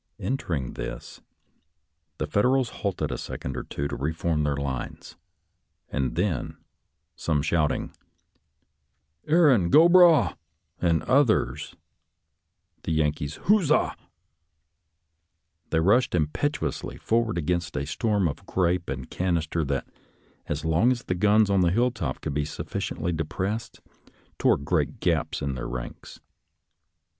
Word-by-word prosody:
Entering 80 - -2
this, - - -7 1.0
the - - -1
Federals 125 +3 +2
halted 100 -3 -1
a - - -4
second - - -5
or - - -3
two 70 - -4
to - - -5
reform 80 +2 -1
their 75 -1 0
lines; 70 -3 -5 0.7
and 65 -4 -2
then, 90 -1 -1 0.6
some 75 -3 0
shout 75 -1 +2
ing, - - -4 0.7
" 70 +3 -44
Erin 145 - +4
go 160 - +7
bragh! 170 - +6 0.2
" 80 0 -40
and 85 -2 +2
others 130 -3 +2 1.1
the - - -4
Yankee 75 -2 0
huzzah, 160 - +2 1.7
they 80 - +2
rushed 105 +6 +3
impetuously 85 - -2
forward 115 -3 0
against 85 0 -1
a 70 - -2
storm 100 +4 0
of 70 - -5
grape 90 -1 0
and 65 -2 -5
canister 85 -3 -1
that, 70 -1 -2 0.6
as 75 +1 -3
long 80 +10 +3
as 125 0 -2
the - - -1
guns 105 +3 +4
on 100 -1 +2
the 90 - +4
hilltop 110 - 0
could - - -3
be 75 +1 0
sufficiently 80 +3 -4
de 80 -1 -1
pressed, 100 +8 -4 0.6
tore - - +4
great 70 - -1
gaps - - 0
in 70 -1 -1
their 60 - -5
ranks. - - -7
85 Hz, 130 wpm, -26 LUFS, 75-110 Hz, 1.7 s, go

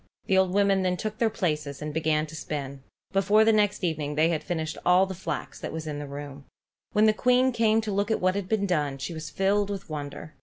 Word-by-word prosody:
The 190 - +2
old 190 -1 +3
women 200 0 +3
then 180 -1 0
took 215 +2 -4
their 230 - +3
places 150 -10 -2
and 150 0 -5
began 155 -1 +1
to 155 0 -10
spin. 140 -3 -5 0.3
Before 205 +3 +4
the 225 - +5
next 205 -2 +1
evening 150 -4 -1
they 155 +2 +3
had 160 -2 -1
finished 160 -4 -3
all 180 +2 +5
the 190 - -6
flax 190 - -5
that - - -5
was 160 0 -5
in 150 -2 -4
the 145 - -6
room. 140 0 -8 0.5
When 210 +1 +4
the 215 - +5
Queen 250 +3 +3
came 225 -2 +3
to 215 -1 -4
look 200 +2 0
at 220 - +1
what 185 0 +2
had 195 -1 -4
been 215 -2 +1
done, 150 -7 0
she 135 +6 -5
was 160 -1 -6
filled 200 +1 +1
with 195 -5 -6
wonder. 150 +1 -6
180 Hz, 240 wpm, -27 LUFS, 150-205 Hz, 0.5 s, the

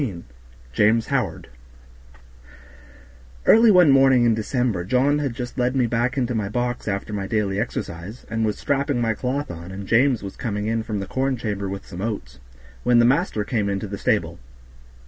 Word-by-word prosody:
14 95 -11 -4 0.5
James 110 - +3
Howard 130 -6 -2 2.0
Early 225 +1 +7
one 180 -7 +6
morning 135 -2 +5
in 115 - +4
December 110 -3 -1
John 130 +9 +2
had 140 -5 -2
just 125 0 -6
led 125 +2 +1
me 125 -3 +2 0.3
into 125 -2 -1
my 105 -3 -2
box 120 +1 -2
after 100 +1 -3
my 100 -2 -3
daily 100 -2 -1
exercise, 105 -1 -5
and 110 0 -2
was 105 -1 -1
strapping 140 -2 0
my 115 -2 +1
cloth 130 +4 -3
on 85 +2 -9
and 100 +1 -7
James 120 +2 +2
was 100 - -7
coming 105 -4 -3
in 115 +1 0
from 110 -2 -4
the - - -4
corn 130 +4 -1
chamber 100 -4 -3
with 95 0 -6
some 90 -1 -8
oats, 100 - -5 0.4
when 120 -1 +3
the 120 - +6
master 135 - +1
came 105 -2 -1
into 100 +1 -2
the 100 -1 -6
stable. - - 0
115 Hz, 180 wpm, -23 LUFS, 100-130 Hz, 2.0 s, Early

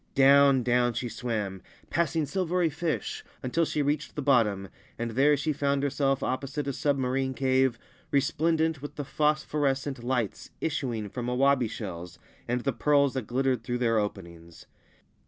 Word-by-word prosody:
Down 140 -1 +6
down 120 0 +2
she 120 +2 -3
swam, 105 -5 -3 0.3
passing 160 -1 +1
silvery 175 +1 0
fish, 160 +1 -3 0.2
until 160 +6 +1
she 150 -1 -1
reached 145 0 -1
thi 150 - -3
bottom, 105 -8 +2 0.3
and 115 0 -3
there 140 +5 +4
she 155 +2 -1
found 140 0 0
herself 135 -1 0
opposite 135 +3 -2
a - - +1
submarim 130 -1 0
cave 130 -2 +2 0.3
resplendent 160 +2 +1
with 145 - -7
the 145 - -4
phosphorescent 145 -3 0
lights 120 -5 -2
issuing 125 -9 -2
from 120 +4 -5
awabi 130 -1 +2
shells 90 -6 -7 0.3
and 120 +1 0
the 135 +1 -1
pearls 140 +3 +3
that 130 -5 -4
glittered 130 -1 0
through 120 +2 -2
thei: 120 -1 +1
openings. 85 -5 -7
135 Hz, 150 wpm, -28 LUFS, 120-145 Hz, 0.3 s, Down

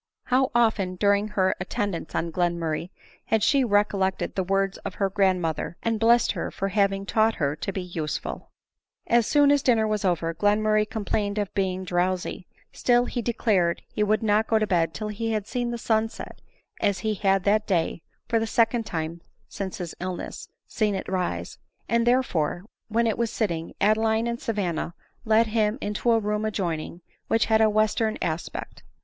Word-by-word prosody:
How 260 +1 +2
often 215 -6 +2
during 200 +2 +2
her 190 -3 +1
attend 200 +2 -2
ance 165 - -6
on 165 +1 -1
Glenmurray 170 -1 -1 0.4
bad 220 -2 +2
she 275 -2 +4
recollected 205 -3 +1
the 190 - -1
words 195 +1 0
of 185 - -6
her 195 -1 0
grandmother, 180 -5 0
and 225 -1 0
blessed 235 +1 +4
her - - -3
for 195 - -3
having 195 0 +1
taught 220 +2 +2
her 145 -1 0
tobeusefid! 175 -4 -4
ADELINE - - -4 0.7
MOWBRAY. - - -3
J87 - - +8
As 230 - -1
soon 290 -1 +5
as 285 -1 +4
dinner 225 -4 +3
was 215 -1 -1
over, 170 -3 0
Glenmurray 210 +3 +2
complained 205 -1 -2
of 205 -2 -2
being 190 -1 -1
drowsy; 180 0 -1 0.2
still 245 0 +2
he 245 - -3
declared 205 -7 +1
he - - -4
would 215 +1 +2
not 215 +1 +2
go 225 - +3
to 215 - +2
bed 165 -5 +1
till 215 0 -4
he 225 +2 -2
had 210 -2 -1
seen 245 +2 -2
the 240 - -3
sun 225 -1 +1
set, - - -10 0.4
as 200 -1 +2
he 215 - +2
had 195 -2 +1
that 210 +1 +2
day, 170 -3 0 0.3
for 230 0 +2
the 225 - -1
second 230 0 +2
time 165 0 -4 0.3
since 190 -2 -5
his 175 -2 -5
illness, 185 0 -5 0.2
seen 210 -3 0
it 190 - -4
rise; 185 -1 -3 0.3
and, 235 0 +1
there 255 +2 +4
fore, 175 -2 -2 0.2
when 230 +1 +1
it 225 -1 0
was 235 -1 +1
sitting, 170 -8 -2
Adeline 220 +2 +2
and 235 0 -3
Savanna 180 -6 -2 0.3
led 220 +1 +4
him 215 0 +1
into 210 +1 -2
a 225 - +4
room 210 0 -1
adjoining, 175 -5 -3 0.3
which 225 - +2
had 220 0 +3
a 220 - +5
western 215 +1 +1
aspect. 165 0 -4
205 Hz, 185 wpm, -25 LUFS, 185-220 Hz, 0.7 s, J87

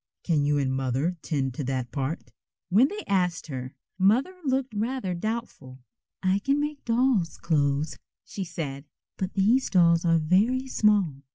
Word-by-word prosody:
"Can 155 -5 +1
you 145 0 +2
and 135 -2 0
Mother 135 +6 -1
'tend 135 -5 -2
to 145 - -4
that 130 -2 -3
part?" 140 +3 -4 0.4
When 220 +9 +5
they 420 +6 -6
asked 180 -4 0
her, 130 -3 -6 0.2
Mother 230 - +3
looked 265 -3 -1
rather 220 -2 -2
doubtful. 180 - -5 0.5
"I 190 +1 +2
can 275 +7 +1
make 295 -1 -3
dolls' 230 -7 +1
clothes," 150 -3 0 0.3
she 195 - -5
said, 150 -5 -5 0.3
"but 190 0 -3
these 220 +7 +3
dolls 170 -3 +4
are 165 -1 +4
very 205 +12 +2
small. 205 - +2
180 Hz, 155 wpm, -26 LUFS, 145-230 Hz, 0.5 s, When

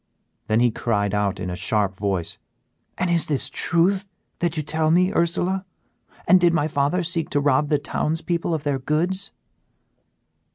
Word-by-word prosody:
Then 110 +2 +2
he 120 -1 +4
cried 105 -3 -1
out, 100 -2 0
in 90 -1 -4
a - - -4
sharp 100 +1 0
voice, 95 -3 -2 0.6
"And 180 -1 0
is 170 -2 +2
this 145 -3 -1
truth 190 +3 +1 0.3
that 170 -2 -1
you 155 - -1
tell 155 +1 0
me, 180 +3 +3
Ursela? 180 +2 0 0.6
and 185 +1 +6
did 170 -1 +4
my 150 -2 +1
father 145 +4 0
seek 170 -2 -2
to 145 - +1
rob 145 +1 +2
the 150 - +3
towns 155 +2 -2
people 170 -1 -1
of 150 - -5
their 140 -2 -1
goods?" 175 +9 -1
155 Hz, 170 wpm, -23 LUFS, 120-175 Hz, 0.6 s, and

